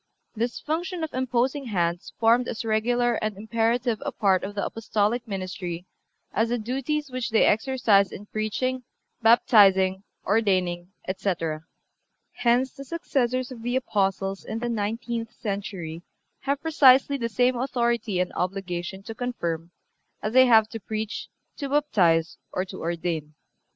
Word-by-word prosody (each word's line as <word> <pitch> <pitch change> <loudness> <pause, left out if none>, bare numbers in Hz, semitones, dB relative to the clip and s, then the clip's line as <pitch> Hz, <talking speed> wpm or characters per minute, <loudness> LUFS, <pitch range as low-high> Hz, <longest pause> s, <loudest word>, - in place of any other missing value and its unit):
This 235 +2 -2
function 340 +3 -3
of 315 - -4
imposing 255 +2 0
hands 175 -5 -1
formed 235 +2 +4
as 230 - -4
regular 240 +2 +1
and 215 -2 -2
imperative 230 +2 0
a - - -2
part 190 -3 +2
of 205 +1 -5
the 200 - -1
Apostolic 225 +2 -1
ministry 185 -3 -5 0.5
as 225 +2 +1
the 240 - +1
duties 270 +5 -2
which 255 -1 -2
they 225 - +4
exercised 220 -4 +3
in 205 - -8
preaching, 215 +5 -2 0.4
baptizing, 195 -5 +5 0.2
ordaining, 185 -4 +1 0.2
etc. 170 -5 -2 0.7
Hence 245 +2 +2
the 275 - -9
successors 255 -4 -1
of 240 -3 -8
the 245 +2 -2
Apostles 195 -5 0
in 220 - -4
the 240 +1 -2
nineteenth 230 +1 -3
century 195 -6 -4 0.4
have 280 +1 -2
precisely 280 -3 +5
the 230 -3 -2
same 250 +3 +2
authority 235 -5 0
and 180 - -1
obligation 185 0 -3
to 225 - -7
confirm 170 -10 -3 0.5
as 215 +1 -2
they 260 0 +7
have 220 -3 +6
to 225 - -6
preach, 215 +2 -4 0.3
to 280 - -4
baptize 180 - +2
or 185 - -1
to - - -9
ordain. 165 -3 -3
225 Hz, 140 wpm, -25 LUFS, 190-245 Hz, 0.7 s, they